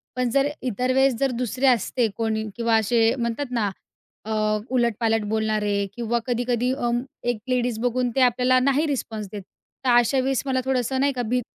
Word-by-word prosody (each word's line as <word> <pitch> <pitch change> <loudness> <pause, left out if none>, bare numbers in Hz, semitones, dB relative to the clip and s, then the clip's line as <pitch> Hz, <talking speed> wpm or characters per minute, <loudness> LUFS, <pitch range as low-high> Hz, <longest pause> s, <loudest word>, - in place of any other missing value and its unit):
पण 250 -1 0
जर 275 +4 +2
इतर 250 +1 -1
वेळेस 265 0 +4
जर 275 -1 +1
दुसरे 250 +3 0
असते 245 -1 +2
कोणी 220 -1 -1
किंवा 230 -1 +1
असे 225 +1 +2
म्हणतात 235 +3 -2
ना 225 -4 0 0.6
अ, 220 - -5 0.4
उलटपालट 230 -3 +1
बोलणारे 215 -1 0 0.2
किंवा 235 0 -1
कधी-कधी 245 0 0
अ, 245 -3 -1 0.4
एक 240 -3 -1
लेडीज 245 -3 0
बघून 245 +1 0
ते 265 - +2
आपल्याला 250 +1 +4
नाही 275 +4 +2
रिस्पॉन्स 225 -7 -3
देत. 205 - -6 0.4
तर - - +3
अशा 240 +3 +3
वेळेस 265 0 0
मला 260 -1 0
थोडंसं 260 0 0
नाही 280 +1 +2
का, 250 - -2
भीत 245 +2 -1
245 Hz, 175 wpm, -24 LUFS, 225-255 Hz, 0.6 s, वेळेस